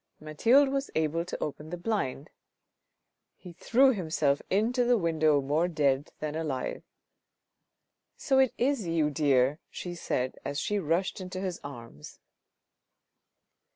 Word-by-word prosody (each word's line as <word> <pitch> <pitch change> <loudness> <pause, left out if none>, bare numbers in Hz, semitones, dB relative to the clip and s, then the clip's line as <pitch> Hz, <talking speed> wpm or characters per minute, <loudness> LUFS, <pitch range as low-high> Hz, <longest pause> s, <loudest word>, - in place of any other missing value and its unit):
Mathilde 235 - +3
was 275 0 -2
able 160 +1 0
to 180 - -5
open 150 +1 -6
the 175 - -5
blind. 170 - -3 1.1
He 180 -2 -12
threw 260 +9 +3
himself 155 -7 0
into 230 +6 +2
the 240 0 +3
window 155 -5 +2
more 150 +5 +1
dead 145 -4 0
than 155 -1 -4
alive. 150 -5 -3 0.7
" - - -55
So 270 -3 +2
it 265 -2 +4
is 250 -6 0
you, 160 -3 +1
dear," 140 -1 +2
she 175 - -6
said 130 -6 -3
as 140 +1 -3
she 210 +4 -1
rushed 180 +3 -1
into 185 0 -6
his 185 -2 -4
arms. 115 - -10
165 Hz, 135 wpm, -29 LUFS, 145-205 Hz, 1.1 s, it